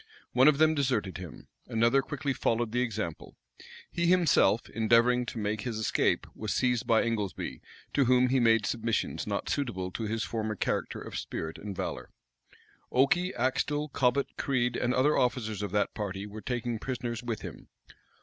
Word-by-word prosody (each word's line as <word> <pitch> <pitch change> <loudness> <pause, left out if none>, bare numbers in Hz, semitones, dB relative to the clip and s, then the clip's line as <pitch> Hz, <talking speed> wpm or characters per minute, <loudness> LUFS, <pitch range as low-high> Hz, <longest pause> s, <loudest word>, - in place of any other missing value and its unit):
One 130 +2 +5
of 150 -2 +5
them 155 +1 +5
deserted 125 -11 -1
him. 90 -5 -10 0.2
Another 115 +4 +3
quickly 140 +1 -3
followed 120 -3 0
the 125 +2 +1
example. 110 -9 -4 0.6
He 170 0 0
himself, 170 - +4
endeavoring 120 +2 +3
to - - -5
make 105 0 -1
his 115 -2 -3
escape, 110 - +1
was 110 -1 -3
seized 125 -2 +1
by 115 -1 +4
Ingoldsby, 110 -5 -3 0.3
to 140 - +3
whom 125 +1 +4
he 130 +1 +3
made 115 -2 +4
submissions 115 -1 -1
not - - -2
suitable 95 -10 -2
to 110 - -4
his 115 +1 -1
former 110 -1 -2
character - - -2
of - - -5
spirit 80 0 -5
and 100 -2 -6
valor. - - -4 0.8
Okey, 175 +8 +3
Axtel, 145 +4 0
Cobbet, 135 0 0
Crede, 125 -3 0
and 125 +1 0
other 145 +4 +3
officers 115 -4 0
of 105 - -2
that 105 -1 +1
party, 100 -2 -4
were 105 +1 -8
taken 120 -2 -2
prisoners 120 -2 -4
with 120 -3 -4
him. - - -9
120 Hz, 170 wpm, -29 LUFS, 110-130 Hz, 0.8 s, One